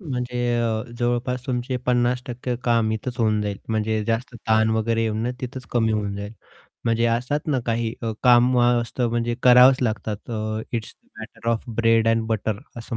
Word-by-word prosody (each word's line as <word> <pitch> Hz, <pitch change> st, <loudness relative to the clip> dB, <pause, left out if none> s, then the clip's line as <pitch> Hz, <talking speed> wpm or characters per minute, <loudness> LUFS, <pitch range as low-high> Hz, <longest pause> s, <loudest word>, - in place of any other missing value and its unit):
म्हणजे 125 Hz, -7 st, -4 dB, 0.6 s
जवळपास 120 Hz, +1 st, -1 dB
तुमचे 125 Hz, 0 st, -2 dB
50% 125 Hz, 0 st, +2 dB
टक्के 125 Hz, 0 st, -4 dB
काम 115 Hz, -2 st, +2 dB
इथेच 120 Hz, +3 st, -4 dB
होऊन 110 Hz, -2 st, +2 dB
जाईल 100 Hz, -2 st, -3 dB
म्हणजे 110 Hz, -1 st, 0 dB
जास्त 115 Hz, +3 st, -2 dB
ताण 110 Hz, 0 st, +4 dB
वगैरे 115 Hz, +1 st, +1 dB
येऊन 110 Hz, +2 st, -1 dB
तिथंच 130 Hz, 0 st, -6 dB
कमी 115 Hz, -2 st, +1 dB
होऊन 105 Hz, -2 st, -2 dB
जाईल 100 Hz, +1 st, -6 dB, 0.5 s
म्हणजे 115 Hz, 0 st, +1 dB
असतात 125 Hz, +5 st, 0 dB
ना, 140 Hz, -5 st, +1 dB
काही 115 Hz, -1 st, -1 dB
अ, 115 Hz, -, -1 dB
काम 125 Hz, 0 st, +5 dB
असतं 120 Hz, 0 st, +1 dB
म्हणजे 120 Hz, 0 st, -1 dB
करावंच 125 Hz, +1 st, +7 dB
लागतात 110 Hz, -1 st, -3 dB, 0.4 s
it's 115 Hz, -2 st, -4 dB
the -, -, -36 dB
matter 110 Hz, +1 st, -7 dB
of 115 Hz, -1 st, -1 dB, 0.2 s
bread 115 Hz, -1 st, +3 dB
and 115 Hz, 0 st, +1 dB
butter 110 Hz, -2 st, -1 dB, 0.2 s
असं 115 Hz, 0 st, -5 dB
115 Hz, 165 wpm, -23 LUFS, 110-125 Hz, 0.6 s, करावंच